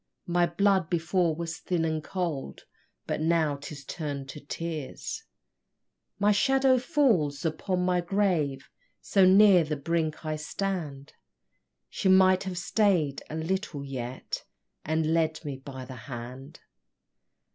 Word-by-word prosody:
My 175 0 +2
blood 190 0 +2
before 170 0 +1
was 165 0 -5
thin 170 -3 -1
and 155 -1 -1
cold 165 - -4 0.4
But - - -2
now 160 -3 +2
'tis 140 -1 -9
turn'd 140 -4 -5
to 150 - -7
tears; 155 -1 -5 0.9
My 205 +1 +3
shadow 265 +4 +4
falls 190 - +1
upon 180 +3 -1
my 180 -1 +2
grave, 170 -8 0 0.3
So 195 -2 +3
near 190 -2 +7
the 155 0 -2
brink 160 +1 -2
I 155 0 -1
stand, 155 -4 -4 0.7
She 190 - -1
might 185 0 +5
have 185 -2 -4
stay'd 175 -7 +1
a 155 - -5
little 160 -3 -2
yet, 130 -2 -5 0.4
And 160 0 0
led 160 -1 0
me 140 -2 -4
by 130 -1 -8
the 130 - -9 0.2
hand! 125 +2 -8
165 Hz, 130 wpm, -28 LUFS, 145-185 Hz, 0.9 s, near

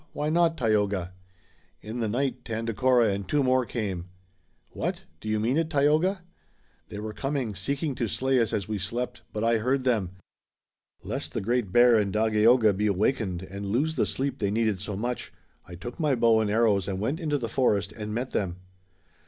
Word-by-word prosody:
Why 150 +1 -1
not, 165 0 +2
Tayoga?" 100 -6 0 0.7
"In 110 +3 -5
the 115 - 0
night, 130 +5 -1
Tandakora 115 +1 +2
and 100 -1 -4
two 145 -1 +2
more 130 -1 +2
came." 95 -6 -4 0.6
"What? - - -3 0.2
Do 110 - -6
you 110 0 +1
mean 120 +6 +1
it, 165 -1 0
Tayoga?" 160 +6 +2 0.7
"They - - -7
were 105 +1 -5
coming, 135 -3 -2
seeking 140 - -2
to 120 -2 -2
slay 130 +5 +1
us 115 - 0
as 100 - -2
we 105 -1 -2
slept, 115 +7 -3
but 105 - -3
I 115 0 +3
heard 130 +4 0
them. 110 -8 0 0.9
Lest - - -4
the - - +1
Great 115 -1 -1
Bear 120 +2 +6
and 100 -2 0
Dagaeoga 110 +1 +4
be 105 +2 +1
awakened 100 -2 0
and 100 +1 -6
lose 145 +10 0
the - - +1
sleep 135 0 -2
they 100 - 0
needed 110 -3 0
so 105 0 -4
much, 120 +5 -3 0.4
I 90 - -9
took 120 - -8
my 150 -4 +2
bow 115 -2 +4
and 110 -2 0
arrows 105 -3 +2
and 95 -1 -2
went 135 - -1
into 150 -4 0
the 120 -4 -3
forest 105 -5 +1
and 105 -1 -6
met 120 +4 -3
them." 90 -4 -1
115 Hz, 190 wpm, -27 LUFS, 105-130 Hz, 0.9 s, Bear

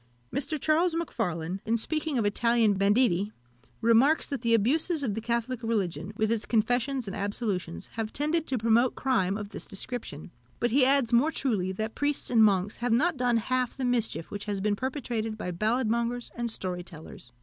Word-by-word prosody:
Mr. 290 +2 -1
Charles 325 +4 +2
Macfarlane, 190 - -2
in 230 +1 +1
speaking 310 +3 -1
of 225 - +1
Italian 230 +1 +3
banditti, 200 0 +2 0.5
remarks, 235 +7 +4
that 275 -4 -4
the 230 -1 +3
abuses 295 - +1
of 225 -6 -1
the 220 - -4
Catholic 235 +1 -2
religion, 205 -5 -2
with 220 0 +1
its 230 -2 -1
confessions 245 +3 +1
and 195 - -4
absolutions, 200 -4 -3
have 220 -1 -2
tended 310 +2 0
to 260 - -1
promote 230 +2 +3
crime 200 -7 +1
of 205 -2 -6
this - - -7
description. 195 - -6 0.3
But 240 - +1
he 260 +1 +5
adds 265 -3 +2
more 265 +7 +4
truly, 210 -12 0
that 220 +3 -3
priests 290 -2 -2
and 225 -2 +6
monks 200 -1 +2
have 245 0 -1
not 305 +9 +3
done 245 -2 +2
half 255 +3 -1
the 265 - -2
mischief 235 -8 -1
which 205 0 -5
has 205 -2 -2
been 205 +1 +1
perpetrated 235 -3 -3
by 180 - -4
ballad 220 +7 0
mongers 235 +2 -1
and 240 0 -3
story 185 -5 -4
tellers. 160 -7 -12
230 Hz, 185 wpm, -28 LUFS, 205-255 Hz, 0.5 s, and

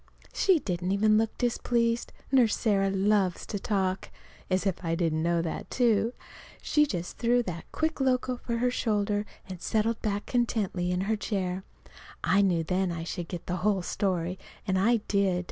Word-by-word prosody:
She 380 -3 +4
didn't 180 - -2
even 215 +1 +4
look 225 -1 -1
displeased 235 -1 0 0.2
Nurse 245 -5 +4
Sarah 195 -3 +2
loves 195 -1 +1
to 205 - -4
talk. 190 -2 -1 0.4
(As 185 +1 +1
if 190 -2 -1
I 165 -1 0
didn't 165 -2 0
know 170 0 +1
that, 165 - -4
too!) 235 -1 +2 0.5
She 300 0 +2
just 175 -7 -4
threw 240 +1 +3
that 170 -5 -7
quick 315 -2 -1
look 255 -1 +2
of 250 -1 -2
hers - - -20
over - - +1
her 250 0 +2
shoulder 210 -3 0 0.2
and 185 -2 -8
settled 220 +1 0
back 205 -2 -1
contentedly 210 -7 0
in 180 0 0
her 215 +3 +1
chair. 190 -3 -2 0.6
I 195 +2 +4
knew 175 -4 +2
then 185 +2 0
I 165 -1 -4
should 170 0 -4
get 175 -1 -6
the 180 - -2
whole 195 0 +1
story. 180 -1 -1 0.3
And 190 -2 +1
I 230 +3 +3
did. 195 -3 +2
200 Hz, 180 wpm, -28 LUFS, 180-230 Hz, 0.6 s, She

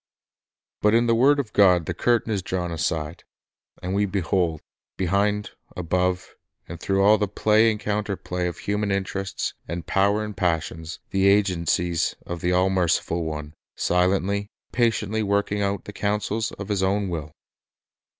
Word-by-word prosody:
But 105 +1 +4
in 120 +1 +4
the 115 - +3
word 140 +5 +4
of 125 -6 -4
God 90 -5 +5
the 90 - -2
curtain 115 +4 +1
is 100 - -1
drawn 90 -1 -3
aside, 80 0 -2 0.6
and 90 +1 -2
we 100 +1 +2
behold, 90 -4 0 0.4
behind, 100 +3 0 0.3
above, 90 +1 -1 0.3
and 85 -1 -8
through 95 +1 +1
all 105 +1 +6
the 105 - +1
play 110 +3 +3
and 110 -1 -2
counter 105 -1 -2
play 90 -1 -3
of 85 - -5
human 105 0 -2
interests 100 0 -2
and 85 -1 -5
power 100 +2 +2
and 105 -1 -6
passions, 80 -2 -2
the 95 0 +3
agencies 90 -4 +2
of 85 -1 -5
the 90 - +1
all 90 +1 +3
merciful 85 -2 +1
One, 75 -1 -5 0.2
silently, 95 +3 +1 0.2
patiently 110 -3 +1
working 100 0 0
out 100 -1 -1
the 105 - -8
counsels 105 +2 -1
of 100 +1 -8
His 100 -2 0
own 100 +1 +1
will. 80 -4 -4
95 Hz, 160 wpm, -24 LUFS, 90-105 Hz, 0.6 s, all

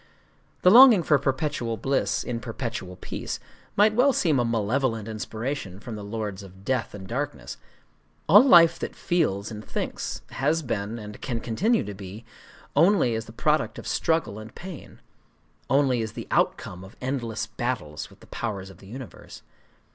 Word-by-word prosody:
The 180 - +7
longing 235 -5 +9
for 150 -2 +4
perpetual 135 -4 -1
bliss 135 +6 0
in 120 -1 -3
perpetual 115 -6 -5
peace 90 - -5 0.4
might 210 +1 +5
well 255 +5 +4
seem 155 - +2
a - - +3
malevolent 115 0 0
inspiration 110 -2 -4
from 110 +1 -7
the 105 - -7
Lords 105 -2 -4
of 95 0 -14
Death 125 -5 -1
and 95 -2 -9
Darkness. 115 - -4 0.7
All 205 +9 +9
life 170 -9 +7
that - - -5
feels 120 - 0
and 105 0 -7
thinks - - -4
has 155 +4 0
been, 115 -3 -3
and 105 -2 -9
can 120 -3 -2
continue 210 - +1
to 105 - -6
be, 100 +3 -9 0.5
only 170 - +4
as 110 0 -3
the - - -11
product 150 +6 0
of - - -8
struggle 160 -10 0
and 110 +1 -11
pain,—only 140 -6 -3
as 110 -1 -4
the - - -7
outcome 90 +1 0
of 95 - -13
endless 125 -4 -2
battle 120 -11 -3
with 75 - -9
the - - -14
Powers 100 -4 -5
of 95 - -17
the 95 - -14
Universe. 125 +4 -10
115 Hz, 160 wpm, -26 LUFS, 105-150 Hz, 0.7 s, longing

